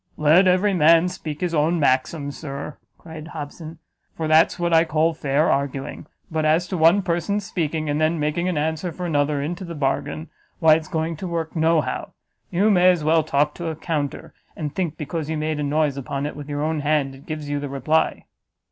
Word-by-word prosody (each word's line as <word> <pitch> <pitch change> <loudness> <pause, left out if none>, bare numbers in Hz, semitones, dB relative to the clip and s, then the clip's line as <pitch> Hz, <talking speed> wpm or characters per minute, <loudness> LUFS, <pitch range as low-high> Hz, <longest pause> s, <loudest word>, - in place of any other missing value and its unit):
"Let 160 +5 +5
every 185 +3 +3
man 165 +1 +5
speak 155 -4 -7
his 175 -2 -1
own 165 +2 +2
maxim, 140 +1 +1
Sir," 140 0 -7 0.2
cried 160 -2 -10
Hobson; 160 +1 -8 0.4
"for 160 - -3
that's 155 +1 +4
what 175 -1 0
I 165 0 +6
call 160 0 +1
fair 150 0 +1
arguing: 140 +1 -3 0.2
but 160 -1 -1
as 160 +3 +2
to - - -2
one 170 +5 +5
person's 180 +4 -1
speaking, 160 -4 -2
and 150 +1 0
then 160 +1 +1
making 150 +4 0
an 175 - -2
answer 160 +3 -1
for 180 +2 -6
another 145 -3 0
into 175 +5 -4
the 170 -2 -7
bargain, 150 +3 -2 0.3
why 160 -1 +6
it's 155 0 0
going 160 0 -2
to 185 - -5
work 165 -1 -3
no 160 0 +3
how; - - -5 0.4
you 200 +5 +2
may 180 -2 +5
as 175 -4 +2
well 160 +1 +4
talk 150 -1 +1
to 170 - -6
a 160 - -3
counter, 150 -3 -4 0.2
and 150 -3 -4
think 170 -5 -2
because 155 0 -4
you 160 - -1
make 155 0 -2
a - - -1
noise 145 -1 0
upon 140 +1 -3
it 150 - -4
with 145 0 -9
your 145 0 -2
own 155 0 -1
hand, 145 -2 0
it 135 +1 -15
gives 155 -2 -5
you 145 0 -2
the 145 -1 -5
reply." 140 +4 0
155 Hz, 210 wpm, -22 LUFS, 150-170 Hz, 0.4 s, I